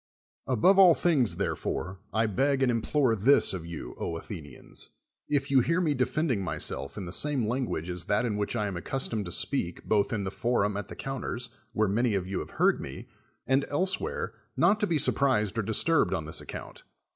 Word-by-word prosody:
Above 135 - +4
all 180 -4 +8
things, 145 -10 +2
therefore, 95 +1 -3
I 110 +2 +2
beg 135 +6 +1
and 125 - +3
implore 120 +1 +1
this 115 +5 +4
of 85 -3 -5
you, 85 -2 -7
Athenians, 80 -4 -6 0.4
if 145 -1 0
you 135 - +6
hear 165 +8 +1
me 160 -5 +2
defend 145 +4 0
ing 100 -5 0
myself 70 -4 -2
in 100 - -4
the 85 - -6
same 135 +1 +2
language 120 -9 -2
as 90 -1 -2
that 105 +4 +1
in 110 -3 -1
which 105 +2 -2
I 105 -2 0
am 100 -3 -3
accustomed 110 +2 -2
to 85 - -6
speak 90 - 0
both 105 -2 +1
in 105 -4 -1
the 95 - -3
forum 105 -3 0
at 100 -1 -4
the - - -9
counters, 125 -2 -4 0.3
w^here 110 0 +2
many 110 +2 +1
of 95 -2 -1
you 95 0 -3
have - - -6
heard - - +3
me, - - -8 0.4
and 135 +1 +2
elsewhere, 185 +6 -1 0.2
not 210 +2 +4
to 210 - +1
be 165 - +1
surprised 130 -7 +2
or - - +3
disturbed 110 +10 +2
on 80 - -4
this 80 - -3
account. - - -8
115 Hz, 200 wpm, -28 LUFS, 100-140 Hz, 0.4 s, all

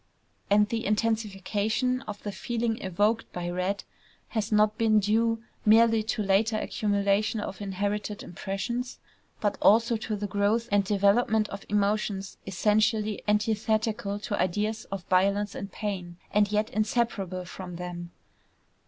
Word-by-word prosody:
And 210 +1 +5
the 225 +1 -2
intensification 215 +3 0
of 205 -1 -7
the 205 - -3
feeling 230 +1 -2
evoked 205 +5 0
by 175 0 -4
red 185 +3 -1 0.5
has 220 -1 -2
not 210 0 +4
been 220 -1 +4
due 225 +2 +1 0.2
merely 225 +1 +5
to 215 0 -2
later 205 +3 +2
accumulation 205 +1 0
of 205 -1 -5
inherited 205 +1 -3
impressions, 235 +8 -4 0.4
but 205 -1 0
also 230 +2 +5
to 215 0 -3
the 205 0 -3
growth 205 +4 +1
and 205 0 +4
development 210 +2 +2
of 195 0 -8
emotions 205 -1 0
essentially 215 +2 +1
antithetical 215 0 0
to 210 -1 -2
ideas 210 +4 -1
of 195 -2 -6
violence 200 +3 +2
and 200 0 -6
pain, 180 -5 -4
and 205 0 +3
yet 215 +1 0
inseparable 210 -4 -1
from 180 0 -8
them. 175 0 -6
210 Hz, 135 wpm, -27 LUFS, 195-220 Hz, 0.5 s, And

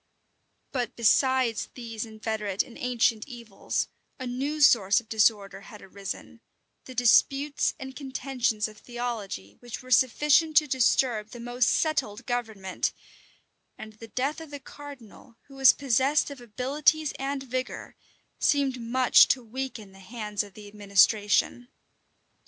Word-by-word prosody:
But 245 -4 -3
besides 245 0 +2
these 230 -2 -6
inveterate 215 -2 -2
and 235 - -15
ancient 235 -2 0
evils, 235 -6 -4 0.3
a 260 - -6
new 270 +5 -3
source 215 -8 +5
of 235 - -15
disorder 205 -3 +1
had 210 0 -12
arisen, 195 0 -8 0.4
the 255 - -10
disputes 275 +4 +3
and 265 0 -8
contentions 255 -5 -2
of 215 -1 -14
theology 230 - -6
which 240 +1 -8
were 255 - -12
sufficient 295 +5 +3
to 305 - +6
disturb 245 -4 +1
the 240 - -10
most 245 0 0
settled 265 -8 -1
government; 220 -6 -3 0.8
and 215 0 -10
the 225 +2 -12
death 275 +7 -2
of 320 - -10
the 285 0 -8
cardinal, 265 -5 -13
who 275 - -18
was 270 -1 +7
possessed 275 +3 +1
of 275 -3 -10
abilities 280 +6 0
and 270 0 -3
vigor, 255 0 -5 0.4
seemed 270 -3 +1
much 250 +2 +5
to 255 - 0
weaken 230 -3 -6
the 195 - -17
hands 210 0 -4
of 205 -2 -10
the 210 -1 -11
administration. 205 +3 +2
245 Hz, 135 wpm, -27 LUFS, 215-265 Hz, 0.8 s, was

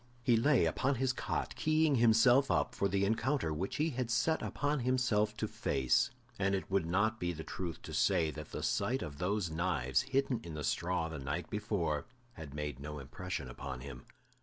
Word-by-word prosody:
He 120 - +4
lay 125 - +4
upon 130 - +1
his 130 +1 +1
cot, - - -2
keying 155 -2 +3
himself 120 +4 +5
up - - +1
for 100 - +1
the 100 0 +1
encounter 110 - 0
which 90 +6 -3
he 155 +2 +1
had 125 -2 -2
set 120 +8 +2
upon 145 +1 -1
himself 120 -4 +1
to 110 - -1
face, 65 -9 +1 0.3
and 100 0 +2
it 95 - -4
would 95 -4 +1
not 110 +5 +1
be 90 0 -1
the 80 -1 -7
truth 85 -1 -5
to - - -8
say 80 -2 +2
that 75 0 -8
the - - -5
sight 130 +2 0
of 70 -1 -7
those 95 -1 0
knives 80 -7 +1
hidden 135 -2 0
in 80 -2 -7
the 75 - -4
straw 85 +3 0
the 80 -2 -6
night 75 +6 -4
before 90 -7 -1 0.3
had 75 -4 -9
made 75 -3 -4
no 75 +1 -6
impression 70 +2 -5
upon 65 0 -6
him. 65 -2 -9
95 Hz, 195 wpm, -33 LUFS, 75-120 Hz, 0.3 s, himself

